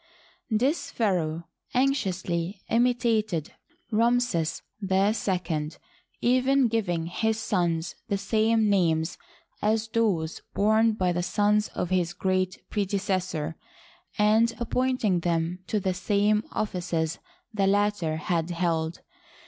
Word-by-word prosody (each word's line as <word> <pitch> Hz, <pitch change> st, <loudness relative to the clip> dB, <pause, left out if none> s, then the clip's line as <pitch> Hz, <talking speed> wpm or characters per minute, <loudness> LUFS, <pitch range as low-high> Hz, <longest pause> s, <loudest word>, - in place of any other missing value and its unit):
This 255 Hz, +8 st, +1 dB
pharaoh 170 Hz, -7 st, 0 dB, 0.3 s
anxiously 190 Hz, -8 st, 0 dB
imitated 230 Hz, -, +1 dB, 0.4 s
Ramses 230 Hz, -7 st, +1 dB, 0.2 s
II, 190 Hz, -5 st, 0 dB, 0.5 s
even 255 Hz, +2 st, +3 dB
giving 175 Hz, -7 st, -1 dB
his 220 Hz, +6 st, -1 dB
sons 175 Hz, -6 st, 0 dB
the 200 Hz, -, 0 dB
same 220 Hz, +1 st, +2 dB
names 165 Hz, -5 st, +1 dB, 0.4 s
as 220 Hz, +1 st, +1 dB
those 195 Hz, -9 st, 0 dB
borne 220 Hz, +2 st, +4 dB
by 185 Hz, -4 st, +1 dB
the 175 Hz, 0 st, -1 dB
sons 210 Hz, +3 st, +2 dB
of 180 Hz, -, -2 dB
his 175 Hz, -2 st, +1 dB
great 185 Hz, -1 st, -1 dB
predecessor, 190 Hz, -6 st, -1 dB, 0.6 s
and 220 Hz, +2 st, +4 dB
appointing 240 Hz, -5 st, +1 dB
them 170 Hz, +1 st, -1 dB
to 215 Hz, -, 0 dB
the 190 Hz, -1 st, 0 dB
same 205 Hz, +3 st, +1 dB
offices 175 Hz, -5 st, -2 dB, 0.3 s
the 200 Hz, -2 st, +1 dB
latter 200 Hz, -5 st, +1 dB
had 165 Hz, +1 st, -1 dB
held. 165 Hz, -1 st, -1 dB
195 Hz, 105 wpm, -27 LUFS, 175-220 Hz, 0.6 s, borne